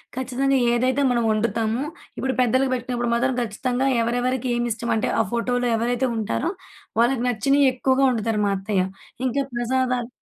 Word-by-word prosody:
ఖచ్చితంగా 260 +1 0
ఏదైతే 255 +3 +1
మనం 235 -1 +1
వండుతామో 225 +3 0 0.3
ఇప్పుడు 265 0 -1
పెద్దలకి 260 +2 +2
పెట్టినప్పుడు 245 -1 -2
మాత్రం 260 +2 +1
ఖచ్చితంగా 245 +4 -1 0.2
ఎవరెవరికి 245 +2 -1
ఏమిష్టం 235 -1 -2
అంటే 220 - 0
ఆ - - +6
ఫోటోలో 245 +1 0
ఎవరైతే 245 +3 0
ఉంటారో 225 +8 -1 0.5
వాళ్ళకి 240 0 +2
నచ్చినయి 275 +5 +3
ఎక్కువగా 260 +1 +1
వండుతారు 225 -2 0
మా 200 - +1
అత్తయ్య. 195 -1 0 0.4
ఇంకా 275 +3 0
ప్రసాదాలు 250 0 0
245 Hz, 140 wpm, -23 LUFS, 230-260 Hz, 0.5 s, ఆ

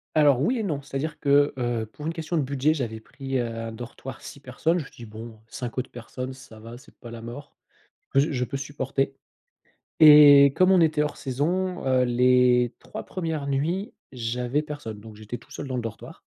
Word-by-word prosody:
Alors 145 -4 +5
oui 245 - +1
et - - -1
non, 150 -7 -2
c'est-à-dire 145 +2 -5
que, 145 0 +3
heu, 120 -2 -1
pour 150 +8 -9
une 165 - -2
question 165 +1 -3
de - - +2
budget, 140 +3 +1
j'avais 115 -7 -4
pris, 135 +3 -5
heu, 120 - 0
un 115 0 -5
dortoir 120 +3 -9
6 140 - -10
personnes, 155 +6 -1
je - - -4
me - - -13
suis 120 - -13
dis: - - -14
«Bon 110 0 -9
5 120 +1 -6
autres 130 - -3
personnes, 125 +2 -7
ça 130 -4 -14
va, 115 +2 -10
c'est 140 - -19
pas 120 - -11
la 115 -1 -8
mort, 120 +5 -9 0.6
ze 145 +3 +3
je 125 -2 -1
peux 140 - -6
supporter.». 135 -1 -2 0.9
Et 145 -2 +9
comme 185 +1 +4
on 185 -2 +5
était 155 -2 +3
hors 150 - -4
saison, 175 +7 -2
heu, 130 -1 +3
les 125 0 +3
3 - - -8
premières 160 -5 -4
nuits, 165 +9 -1 0.2
j’avais 125 +3 -2
personne, 145 -8 -7
donc 110 0 -12
j'étais 110 +3 -7
tout - - -22
seul 145 - -6
dans 130 - -3
le 120 - -1
dortoir. 115 -2 -8
135 Hz, 210 wpm, -25 LUFS, 120-150 Hz, 0.9 s, Et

